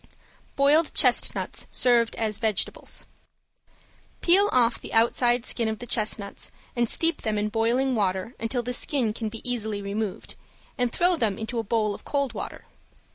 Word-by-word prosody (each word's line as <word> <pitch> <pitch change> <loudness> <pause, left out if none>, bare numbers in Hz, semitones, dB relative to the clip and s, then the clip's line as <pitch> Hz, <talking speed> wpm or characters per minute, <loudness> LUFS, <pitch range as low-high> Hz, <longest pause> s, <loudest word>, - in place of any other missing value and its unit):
~BOILED 295 +3 +3
CHESTNUTS - - +2
SERVED 240 -2 +3
AS 215 -2 -2
VEGETABLES~ 220 -4 -2 1.2
Peel 390 +4 +4
off 240 -2 +2
the - - -7
outside 240 +1 +3
skin 230 -2 +1
of 220 0 -2
the 245 - -8
chestnuts 215 -3 -1 0.3
and 240 -2 +1
steep 330 +1 +2
them 215 -2 -1
in 210 +1 -1
boiling 235 +4 +1
water 190 0 -1
until 235 +2 -2
the 250 +1 -2
skin 245 -4 +1
can 220 -1 -4
be 225 +2 -8
easily 220 -4 -2
removed, 200 0 -4 0.4
and 245 -1 0
throw 355 +6 +2
them 220 - 0
into 220 +2 -4
a - - -1
bowl 215 -1 0
of - - -11
cold 280 -4 -1
water. 210 - -7
230 Hz, 160 wpm, -25 LUFS, 215-250 Hz, 1.2 s, Peel